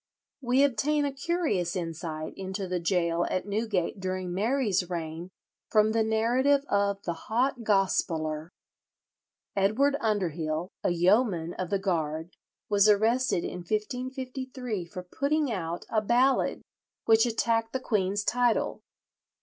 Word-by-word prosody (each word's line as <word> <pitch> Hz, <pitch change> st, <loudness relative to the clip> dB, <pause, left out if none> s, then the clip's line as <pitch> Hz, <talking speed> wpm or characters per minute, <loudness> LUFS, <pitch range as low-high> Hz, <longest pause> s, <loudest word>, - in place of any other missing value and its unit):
We 255 Hz, +2 st, +3 dB
obtain 285 Hz, +3 st, +2 dB
a 280 Hz, -, -2 dB
curious 275 Hz, -, -1 dB
insight 165 Hz, -2 st, -4 dB
into 190 Hz, 0 st, -4 dB
the 180 Hz, 0 st, -1 dB
gaol 170 Hz, 0 st, +1 dB
at 185 Hz, -, -2 dB
Newgate 205 Hz, -3 st, -1 dB
during 185 Hz, -1 st, -3 dB
Mary's 205 Hz, -3 st, +1 dB
reign 165 Hz, 0 st, -5 dB, 0.4 s
from 215 Hz, 0 st, +4 dB
the 225 Hz, 0 st, +2 dB
narrative 250 Hz, +6 st, +2 dB
of 200 Hz, 0 st, +1 dB
the 170 Hz, -, -2 dB, 0.2 s
"Hot 245 Hz, +3 st, +1 dB
Gospeller." 165 Hz, -6 st, 0 dB, 1.1 s
Edward 220 Hz, +9 st, +3 dB
Underhill, 175 Hz, -6 st, -1 dB
a -, -, +2 dB
yeoman 175 Hz, -1 st, +2 dB
of 185 Hz, -2 st, -4 dB
the 200 Hz, -, +1 dB
Guard, 165 Hz, -3 st, -2 dB, 0.4 s
was 205 Hz, 0 st, +4 dB
arrested 220 Hz, -1 st, +3 dB
in -, -, -4 dB
1553 250 Hz, +2 st, -4 dB
for 180 Hz, +1 st, -8 dB
"putting 280 Hz, +8 st, 0 dB
out" 170 Hz, -4 st, -4 dB
a 215 Hz, -, +1 dB
ballad 245 Hz, +5 st, +2 dB, 0.4 s
which 225 Hz, +1 st, +5 dB
attacked 225 Hz, 0 st, 0 dB
the 260 Hz, -, -2 dB
queen's 205 Hz, -4 st, 0 dB
title. 245 Hz, +1 st, +1 dB
205 Hz, 125 wpm, -28 LUFS, 180-245 Hz, 1.1 s, which